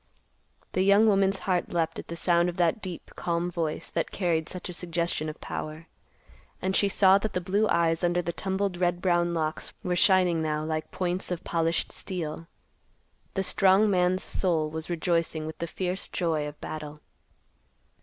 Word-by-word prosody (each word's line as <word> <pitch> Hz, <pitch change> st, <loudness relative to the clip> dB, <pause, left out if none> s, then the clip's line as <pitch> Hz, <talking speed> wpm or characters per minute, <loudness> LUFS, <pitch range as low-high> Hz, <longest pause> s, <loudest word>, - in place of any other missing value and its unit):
The 185 Hz, -, 0 dB
young 200 Hz, +3 st, +5 dB
woman's 195 Hz, -2 st, +3 dB
heart 180 Hz, -2 st, 0 dB
leaped 165 Hz, -2 st, -1 dB
at -, -, -8 dB
the 170 Hz, -, -5 dB
sound 175 Hz, 0 st, +3 dB
of 175 Hz, -, -7 dB
that 175 Hz, +3 st, +2 dB
deep 180 Hz, -4 st, -7 dB
calm 170 Hz, +1 st, -1 dB
voice 165 Hz, -3 st, -2 dB
that 165 Hz, -, -1 dB
carried 170 Hz, -4 st, -1 dB
such 180 Hz, -, -6 dB
a 180 Hz, -, -6 dB
suggestion 170 Hz, -2 st, -2 dB
of 155 Hz, -, -8 dB
power. 155 Hz, +1 st, -6 dB, 0.7 s
And 190 Hz, +1 st, -1 dB
she 200 Hz, -, +3 dB
saw 195 Hz, 0 st, +5 dB
that 215 Hz, 0 st, -3 dB
the -, -, 0 dB
blue 200 Hz, +4 st, +1 dB
eyes 165 Hz, 0 st, +2 dB
under 175 Hz, 0 st, +2 dB
the 170 Hz, -, -3 dB
tumbled 190 Hz, 0 st, -2 dB
red 175 Hz, -1 st, +1 dB
brown 175 Hz, -1 st, +1 dB
locks 155 Hz, -1 st, -2 dB
were 180 Hz, -1 st, 0 dB
shining 180 Hz, -2 st, +4 dB
now 155 Hz, -1 st, -1 dB
like 155 Hz, 0 st, -3 dB
points 180 Hz, +1 st, -2 dB
of 180 Hz, -1 st, -3 dB
polished 165 Hz, 0 st, 0 dB
steel. 165 Hz, -3 st, -5 dB, 0.9 s
The 195 Hz, -, +1 dB
strong 195 Hz, +3 st, +4 dB
man's 185 Hz, 0 st, +2 dB
soul 160 Hz, -5 st, +2 dB
was 160 Hz, +1 st, -5 dB
rejoicing 165 Hz, -2 st, 0 dB
with 160 Hz, -, -7 dB
the 170 Hz, -, -2 dB
fierce 185 Hz, +2 st, -3 dB
joy 160 Hz, -4 st, -1 dB
of 150 Hz, 0 st, -9 dB
battle. 150 Hz, -1 st, -6 dB
175 Hz, 175 wpm, -27 LUFS, 165-185 Hz, 0.9 s, young